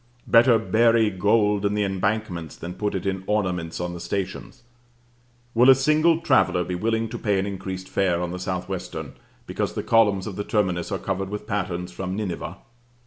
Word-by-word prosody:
Better 115 Hz, 0 st, +6 dB
bury 110 Hz, 0 st, +3 dB
gold 105 Hz, +1 st, +2 dB
in 100 Hz, 0 st, +1 dB
the 105 Hz, -, +1 dB
embankments, 95 Hz, -4 st, -2 dB
than 85 Hz, +1 st, -7 dB
put 105 Hz, +2 st, -2 dB
it 95 Hz, -, -3 dB
in 95 Hz, -1 st, -2 dB
ornaments 90 Hz, -6 st, -1 dB
on 90 Hz, 0 st, -3 dB
the 85 Hz, -, -7 dB
stations. 100 Hz, +6 st, -5 dB, 0.9 s
Will 125 Hz, +3 st, +5 dB
a 135 Hz, -, +9 dB
single 155 Hz, +4 st, +3 dB
traveller 130 Hz, -, +3 dB
be 90 Hz, -, -4 dB
willing 115 Hz, +4 st, 0 dB
to -, -, -6 dB
pay 105 Hz, -3 st, +1 dB
an 95 Hz, -, 0 dB
increased 95 Hz, -1 st, -5 dB
fare 90 Hz, -3 st, +1 dB
on 90 Hz, 0 st, -3 dB
the 90 Hz, -, -5 dB
South 90 Hz, 0 st, -3 dB
Western, -, -, -5 dB, 0.3 s
because -, -, -3 dB
the -, -, -3 dB
columns 105 Hz, -4 st, +3 dB
of 100 Hz, -, -6 dB
the 105 Hz, -, -2 dB
terminus 95 Hz, -4 st, -1 dB
are 100 Hz, -, 0 dB
covered 95 Hz, 0 st, -3 dB
with 105 Hz, +1 st, -5 dB
patterns 90 Hz, -4 st, -3 dB
from 95 Hz, +1 st, -4 dB
Nineveh? 100 Hz, -4 st, -4 dB
100 Hz, 190 wpm, -24 LUFS, 90-110 Hz, 0.9 s, a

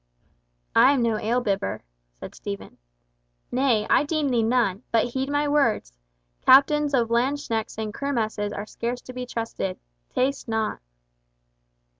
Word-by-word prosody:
"I 280 Hz, -, +7 dB
am 260 Hz, -4 st, +1 dB
no 225 Hz, -2 st, +1 dB
ale 240 Hz, +3 st, 0 dB
bibber," 195 Hz, -, -2 dB, 0.4 s
said -, -, -8 dB
Stephen. 200 Hz, -1 st, -7 dB, 0.7 s
"Nay, 245 Hz, -5 st, +2 dB
I -, -, +4 dB
deemed 295 Hz, -3 st, 0 dB
thee 235 Hz, -, +3 dB
none—but 225 Hz, -1 st, +1 dB
heed 265 Hz, +2 st, -2 dB
my 290 Hz, +1 st, +1 dB
words—captains 235 Hz, -, +2 dB
of 235 Hz, -3 st, +1 dB
landsknechts 235 Hz, -3 st, -1 dB
in 220 Hz, -1 st, -3 dB
kermesses 220 Hz, -5 st, -2 dB
are 205 Hz, 0 st, -5 dB
scarce 240 Hz, +3 st, -4 dB
to 255 Hz, -, -10 dB
be 250 Hz, 0 st, -5 dB
trusted. 225 Hz, -6 st, -4 dB, 0.3 s
Taste 270 Hz, +1 st, -1 dB
not." 220 Hz, -1 st, -1 dB
235 Hz, 130 wpm, -25 LUFS, 215-270 Hz, 0.7 s, I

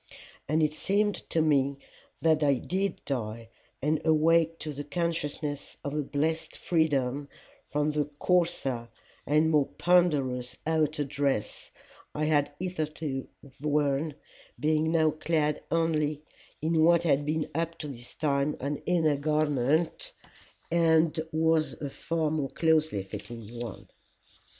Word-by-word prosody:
And 155 Hz, +1 st, +3 dB
it 150 Hz, 0 st, +2 dB
seemed 205 Hz, +5 st, +1 dB, 0.2 s
to 160 Hz, -, +2 dB
me 140 Hz, -3 st, +2 dB, 0.5 s
that 160 Hz, -1 st, +4 dB
I 140 Hz, -2 st, +4 dB
did 190 Hz, +9 st, -2 dB
die, 115 Hz, -4 st, -4 dB, 0.3 s
and 150 Hz, +2 st, +1 dB
awake 165 Hz, +1 st, +3 dB
to 155 Hz, -1 st, -4 dB
the 145 Hz, +1 st, -5 dB
consciousness 150 Hz, -2 st, -3 dB
of 140 Hz, -, -3 dB
a 150 Hz, -, 0 dB
blessed 155 Hz, +3 st, -1 dB
freedom 145 Hz, -4 st, 0 dB, 0.4 s
from 150 Hz, +1 st, 0 dB
the 150 Hz, -1 st, 0 dB
coarser 145 Hz, -10 st, +1 dB, 0.4 s
and 155 Hz, +2 st, +3 dB
more 150 Hz, -3 st, +3 dB
ponderous 145 Hz, -9 st, +2 dB
outer 155 Hz, -2 st, +1 dB
dress 135 Hz, -5 st, -2 dB, 0.5 s
I 155 Hz, 0 st, 0 dB
had 145 Hz, -2 st, +2 dB
hitherto 155 Hz, -6 st, -3 dB, 0.3 s
worn, 145 Hz, 0 st, +1 dB, 0.4 s
being 155 Hz, +3 st, +2 dB
now 160 Hz, -2 st, +4 dB
clad 155 Hz, -1 st, 0 dB
only 155 Hz, -3 st, +1 dB, 0.4 s
in 160 Hz, 0 st, +3 dB
what 170 Hz, +1 st, +5 dB
had 145 Hz, -3 st, +3 dB
been 155 Hz, +1 st, -1 dB
up 165 Hz, +2 st, -2 dB
to 150 Hz, -, -5 dB
this 120 Hz, -4 st, -8 dB
time 145 Hz, -1 st, +1 dB
an 140 Hz, +2 st, -2 dB
inner 160 Hz, -5 st, +3 dB
garment, 155 Hz, -, +1 dB, 0.6 s
and 165 Hz, -1 st, +3 dB
was 160 Hz, 0 st, +2 dB
a 140 Hz, -2 st, -6 dB
far 160 Hz, 0 st, -1 dB
more 150 Hz, -4 st, -1 dB
closely 155 Hz, -, +2 dB
fitting 115 Hz, +3 st, -8 dB
one. 120 Hz, -4 st, -7 dB
155 Hz, 130 wpm, -28 LUFS, 140-160 Hz, 0.6 s, what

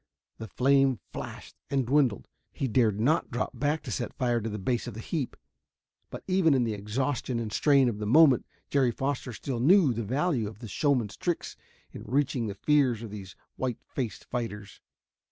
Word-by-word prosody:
The 110 Hz, -, -6 dB
flame 135 Hz, +3 st, +3 dB
flashed -, -, -8 dB
and 135 Hz, -2 st, +1 dB
dwindled. 130 Hz, -5 st, +2 dB, 0.2 s
He 135 Hz, -, -2 dB
dared 110 Hz, -3 st, +2 dB
not 150 Hz, +9 st, +2 dB
drop 120 Hz, -, -2 dB
back 150 Hz, +2 st, -1 dB
to -, -, -6 dB
set -, -, -3 dB
fire 120 Hz, -3 st, 0 dB
to 110 Hz, -, -3 dB
the 105 Hz, -, -4 dB
base 120 Hz, +4 st, -1 dB
of 120 Hz, -, -6 dB
the -, -, -7 dB
heap. 140 Hz, +3 st, -3 dB, 0.7 s
But -, -, -8 dB
even 185 Hz, -6 st, +3 dB
in 130 Hz, -, +2 dB
the 115 Hz, -2 st, -1 dB
exhaustion 120 Hz, +5 st, -2 dB
and 110 Hz, -2 st, -4 dB
strain 140 Hz, -3 st, +4 dB
of 110 Hz, -3 st, -2 dB
the 105 Hz, -, -3 dB
moment 140 Hz, 0 st, +5 dB, 0.2 s
Jerry 135 Hz, -3 st, +3 dB
Foster 135 Hz, +2 st, -2 dB
still 120 Hz, +2 st, -4 dB
knew 155 Hz, +1 st, +5 dB
the 115 Hz, -, -3 dB
value 130 Hz, -, 0 dB
of 105 Hz, -1 st, -9 dB
the 115 Hz, +1 st, -9 dB
showman's 125 Hz, -4 st, 0 dB
tricks 175 Hz, -2 st, -2 dB, 0.4 s
in -, -, -9 dB
reaching 130 Hz, -2 st, 0 dB
the 100 Hz, -, -5 dB
fears 125 Hz, -1 st, +2 dB
of 110 Hz, -, -7 dB
these 95 Hz, -3 st, -9 dB, 0.2 s
white 125 Hz, -3 st, -2 dB
faced 125 Hz, -5 st, -5 dB
fighters. 105 Hz, -4 st, -5 dB
125 Hz, 190 wpm, -28 LUFS, 110-140 Hz, 0.7 s, moment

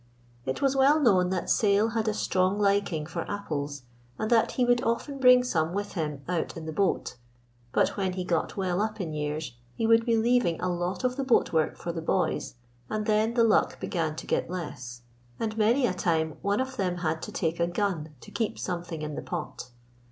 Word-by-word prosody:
It 130 Hz, -, -2 dB
was 275 Hz, 0 st, +3 dB
well 275 Hz, +3 st, +5 dB
known 190 Hz, -10 st, +4 dB
that 185 Hz, -1 st, -2 dB
Sayle 210 Hz, +1 st, +3 dB
had 225 Hz, -1 st, -1 dB
a 215 Hz, -, +2 dB
strong 185 Hz, 0 st, +1 dB
liking 200 Hz, -6 st, +1 dB
for 170 Hz, +1 st, -4 dB
apples, 145 Hz, -9 st, -4 dB, 0.3 s
and 215 Hz, -, -2 dB
that 230 Hz, -1 st, +4 dB
he 250 Hz, -, +2 dB
would 245 Hz, +1 st, +3 dB
often 270 Hz, +4 st, -1 dB
bring 250 Hz, -1 st, +7 dB
some 165 Hz, -9 st, 0 dB
with 205 Hz, +1 st, -3 dB
him 150 Hz, -5 st, -3 dB
out 175 Hz, -2 st, -2 dB
in 160 Hz, -, -7 dB
the 160 Hz, -, -4 dB
boat, 195 Hz, -7 st, 0 dB, 0.5 s
but -, -, +3 dB
when 190 Hz, -2 st, 0 dB
he 185 Hz, 0 st, -3 dB
got 180 Hz, -, -1 dB
well 185 Hz, -1 st, 0 dB
up 215 Hz, 0 st, -2 dB
in 165 Hz, -5 st, -3 dB
years 150 Hz, -3 st, -3 dB, 0.2 s
he 225 Hz, -, -1 dB
would 230 Hz, 0 st, +5 dB
be 230 Hz, -1 st, +2 dB
leaving 230 Hz, -7 st, +2 dB
a 180 Hz, 0 st, -1 dB
lot 175 Hz, +6 st, -3 dB
of 255 Hz, +1 st, 0 dB
the 275 Hz, -, 0 dB
boat 255 Hz, -8 st, +2 dB
work 160 Hz, -1 st, +1 dB
for 170 Hz, -, -4 dB
the 165 Hz, -1 st, -5 dB
boys, 170 Hz, -3 st, -1 dB, 0.3 s
and 215 Hz, 0 st, -2 dB
then 215 Hz, +2 st, +2 dB
the 235 Hz, -, +5 dB
luck 220 Hz, -2 st, +3 dB
began 160 Hz, -4 st, -2 dB
to -, -, -7 dB
get -, -, -1 dB
less, 125 Hz, -9 st, -6 dB, 0.4 s
and 220 Hz, -1 st, -2 dB
many 230 Hz, +5 st, +3 dB
a 185 Hz, -, +1 dB
time 160 Hz, -3 st, 0 dB
one 200 Hz, +1 st, +1 dB
of 260 Hz, 0 st, -3 dB
them 180 Hz, -4 st, -1 dB
had 160 Hz, 0 st, 0 dB
to -, -, -6 dB
take 165 Hz, +1 st, -1 dB
a 170 Hz, -, +2 dB
gun 175 Hz, -5 st, -2 dB
to -, -, -12 dB
keep 225 Hz, -3 st, -2 dB
something 170 Hz, -3 st, -4 dB
in 150 Hz, 0 st, -4 dB
the -, -, -4 dB
pot. 155 Hz, -6 st, -6 dB
185 Hz, 215 wpm, -27 LUFS, 160-225 Hz, 0.5 s, bring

